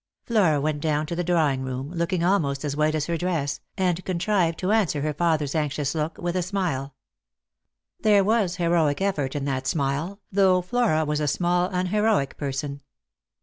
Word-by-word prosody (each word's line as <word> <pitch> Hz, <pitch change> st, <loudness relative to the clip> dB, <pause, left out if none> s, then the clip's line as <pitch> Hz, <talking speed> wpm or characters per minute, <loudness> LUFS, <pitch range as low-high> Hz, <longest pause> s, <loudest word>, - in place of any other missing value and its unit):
Flora 185 Hz, -11 st, +2 dB
went 150 Hz, 0 st, -1 dB
down 150 Hz, -1 st, 0 dB
to 170 Hz, -, -4 dB
the 175 Hz, -, -1 dB
drawing 160 Hz, -6 st, +1 dB
room, 130 Hz, +2 st, -4 dB
looking 170 Hz, 0 st, -1 dB
almost 155 Hz, -7 st, +1 dB
as 145 Hz, -1 st, -2 dB
white 155 Hz, +1 st, +1 dB
as 150 Hz, -2 st, -1 dB
her 170 Hz, 0 st, -1 dB
dress, 160 Hz, -5 st, -1 dB, 0.2 s
and 180 Hz, -2 st, 0 dB
contrived 180 Hz, -2 st, 0 dB
to 185 Hz, +2 st, -1 dB
answer 195 Hz, -10 st, +2 dB
her 150 Hz, +1 st, -1 dB
father's 155 Hz, -3 st, 0 dB
anxious 150 Hz, -2 st, -1 dB
look 160 Hz, 0 st, -2 dB
with 175 Hz, 0 st, -3 dB
a 185 Hz, -, +1 dB
smile. 170 Hz, -8 st, -2 dB, 1.0 s
There 205 Hz, -2 st, +4 dB
was 205 Hz, -4 st, +1 dB
heroic 170 Hz, -4 st, +1 dB
effort 155 Hz, -9 st, -1 dB
in 140 Hz, -1 st, -2 dB
that 130 Hz, -2 st, -2 dB
smile, 145 Hz, +8 st, -1 dB
though 185 Hz, -2 st, +3 dB
Flora 195 Hz, -7 st, +1 dB
was 150 Hz, 0 st, -1 dB
a 150 Hz, -, 0 dB
small 175 Hz, +3 st, +1 dB
unheroic 185 Hz, -3 st, +1 dB
peison. 140 Hz, 0 st, -4 dB
165 Hz, 175 wpm, -25 LUFS, 145-185 Hz, 1.0 s, There